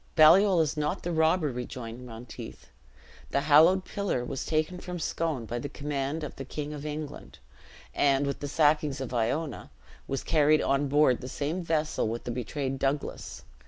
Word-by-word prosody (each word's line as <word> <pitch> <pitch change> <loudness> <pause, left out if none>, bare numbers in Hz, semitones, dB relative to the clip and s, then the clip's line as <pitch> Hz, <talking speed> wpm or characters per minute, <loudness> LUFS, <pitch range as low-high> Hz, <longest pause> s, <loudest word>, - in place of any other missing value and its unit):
"Baliol 175 +3 +7
is 155 -2 0
not 150 0 -2
the 175 - -2
robber," 160 -1 +2
rejoined 125 0 -7
Monteith; 115 - -10 0.6
"the 140 - +1
halloed 160 +6 +5
pillar 195 -12 -2
was 135 +1 -4
taken 155 +3 0
from 180 0 -6
Scone 160 -5 -2
by 120 +2 -4
the 145 - -5
command 145 +2 -3
of 150 - -6
the 135 - -5
King 150 +2 -5
of 150 0 -6
England, 150 -1 -7 0.6
and, 140 0 +3
with 140 - -3
the 145 - -4
sackings 150 -1 +2
of 130 -2 -5
Iona, 135 +7 -1 0.4
was 135 - -3
carried 155 -1 +3
on 140 +1 +1
board 145 -3 +3
the 125 - -6
same 150 +7 -2
vessel 155 -6 0
with 115 +2 -4
the 120 - -4
betrayed 130 +3 -3
Douglas. 140 +2 -3
145 Hz, 170 wpm, -28 LUFS, 130-155 Hz, 0.6 s, Baliol